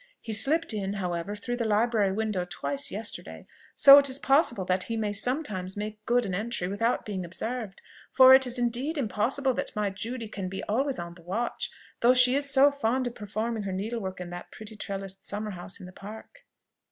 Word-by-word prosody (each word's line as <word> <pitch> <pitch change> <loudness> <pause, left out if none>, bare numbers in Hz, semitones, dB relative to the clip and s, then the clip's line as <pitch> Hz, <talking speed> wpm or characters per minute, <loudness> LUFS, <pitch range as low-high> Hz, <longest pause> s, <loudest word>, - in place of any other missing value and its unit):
He 225 - -6
slipped 290 +7 +1
in, 200 -2 -3
however, 180 0 -3
through 245 +4 -4
the 240 - -1
library 215 -2 +2
window 210 -2 -1
twice 280 +8 -2
yesterday, 210 +2 -6 0.3
so 280 0 +10
it 280 -1 +2
is 260 - -1
possible 270 - +3
that 185 0 0
he 230 - -3
may 210 -2 -1
sometimes 205 -5 0
make 215 +1 -6
good 240 0 +2
an 190 - -4
entry 205 -1 -2
without 230 +5 -1
being 195 -3 -4
observed; 215 +4 -5 0.3
for 260 0 +8
it 265 -1 +6
is 245 +1 +2
impossible 250 0 0
that - - -5
my 210 -2 -1
Judy 225 +4 -5
can 195 -3 -5
be 195 - -6
always 265 +6 -1
on 170 0 -6
the 175 - -16
watch, 205 +8 -3 0.3
though 245 +2 +5
she 250 0 +5
is 280 0 0
so 275 +1 +5
fond 260 -2 -1
of 245 - -3
performing 220 +1 -4
her 200 -1 -4
needlework 195 -1 -4
in 175 -1 -7
that 175 0 -8
pretty 215 0 -10
trellised 195 -1 -6
summer 210 +1 -3
house 185 +1 -8
in - - -10
the 180 - -10
Park." 220 - -12
220 Hz, 200 wpm, -27 LUFS, 195-250 Hz, 0.3 s, so